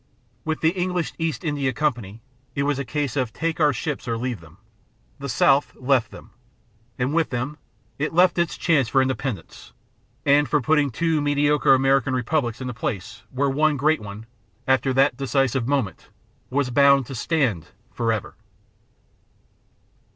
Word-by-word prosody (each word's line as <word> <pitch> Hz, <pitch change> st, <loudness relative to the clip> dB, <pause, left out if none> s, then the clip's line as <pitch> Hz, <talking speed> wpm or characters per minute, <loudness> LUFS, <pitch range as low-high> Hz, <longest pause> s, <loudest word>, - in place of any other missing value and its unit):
With 160 Hz, 0 st, -3 dB
the 160 Hz, -, +4 dB
English 180 Hz, -2 st, -2 dB
East 165 Hz, +1 st, -2 dB
India 145 Hz, -4 st, -1 dB
Company, 115 Hz, -7 st, -2 dB, 0.3 s
it 140 Hz, -, 0 dB
was 145 Hz, -1 st, 0 dB
a -, -, -1 dB
case 145 Hz, +1 st, -3 dB
of 130 Hz, -5 st, -1 dB
"take 165 Hz, +5 st, -3 dB
our 150 Hz, -2 st, +4 dB
ships 140 Hz, +2 st, -4 dB
or 115 Hz, -1 st, -1 dB
leave 125 Hz, -2 st, -3 dB
them." 80 Hz, +2 st, -17 dB, 0.6 s
The 140 Hz, 0 st, -5 dB
South 135 Hz, +4 st, +3 dB
left 130 Hz, -2 st, +1 dB
them, -, -, -13 dB, 0.7 s
and 130 Hz, +3 st, -1 dB
with 165 Hz, -1 st, +1 dB
them 130 Hz, +5 st, -4 dB, 0.4 s
it 150 Hz, -, -1 dB
left 175 Hz, +1 st, +4 dB
its 170 Hz, -, 0 dB
chance 150 Hz, -8 st, +2 dB
for 130 Hz, +4 st, +3 dB
independence 130 Hz, -4 st, -5 dB, 0.5 s
and 145 Hz, 0 st, +4 dB
for 150 Hz, -, +3 dB
putting 150 Hz, +2 st, +2 dB
two 160 Hz, +4 st, 0 dB
mediocre 145 Hz, -1 st, +3 dB
American 135 Hz, 0 st, +2 dB
republics 125 Hz, -1 st, -1 dB
in -, -, -4 dB
the 125 Hz, -, -4 dB
place 105 Hz, -2 st, -5 dB
where 135 Hz, +3 st, 0 dB
one 150 Hz, +1 st, +2 dB
great 155 Hz, +4 st, +2 dB
one, 105 Hz, +1 st, -9 dB, 0.4 s
after 130 Hz, 0 st, +2 dB
that 130 Hz, -2 st, +3 dB
decisive 135 Hz, -2 st, 0 dB
moment, 135 Hz, -8 st, -2 dB, 0.4 s
was 130 Hz, -1 st, 0 dB
bound 140 Hz, 0 st, +5 dB
to 135 Hz, -, -8 dB
stand 120 Hz, -, 0 dB, 0.2 s
forever. 115 Hz, -3 st, -2 dB
135 Hz, 160 wpm, -23 LUFS, 125-150 Hz, 0.7 s, bound